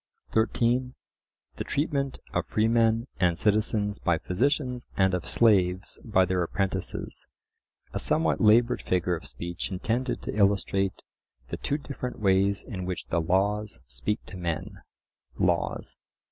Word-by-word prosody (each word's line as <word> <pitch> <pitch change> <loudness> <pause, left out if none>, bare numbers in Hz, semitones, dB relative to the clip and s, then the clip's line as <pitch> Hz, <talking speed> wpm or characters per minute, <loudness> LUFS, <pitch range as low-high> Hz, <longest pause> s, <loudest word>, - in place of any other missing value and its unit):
(13) 120 +3 +1 0.6
the - - -2
treatment 140 -2 -1 0.2
of - - 0
freemen 115 +1 +2
and 90 -2 +3
citizens 105 0 +1
by 85 -3 +2
physicians 125 - -1
and 95 -1 +3
of 90 - -2
slaves 95 -4 +3
by 95 -5 +3
their 90 0 0
apprentices,—a 95 +2 -5
somewhat 80 0 +1
laboured 115 +3 +5
figure 90 -1 +1
of 80 - -9
speech 85 0 -5
intended 115 +7 -2
to - - -4
illustrate 100 -1 +1 0.5
the - - -3
two 145 - -1
different 140 -4 -6
ways 100 0 +2
in 95 -7 -6
which 90 -1 -4
the 85 - +1
laws 100 +5 0
speak 105 +1 -3
to 95 - -9
men 85 -3 -4 0.6
(Laws). - - 0
100 Hz, 130 wpm, -27 LUFS, 90-115 Hz, 0.6 s, laboured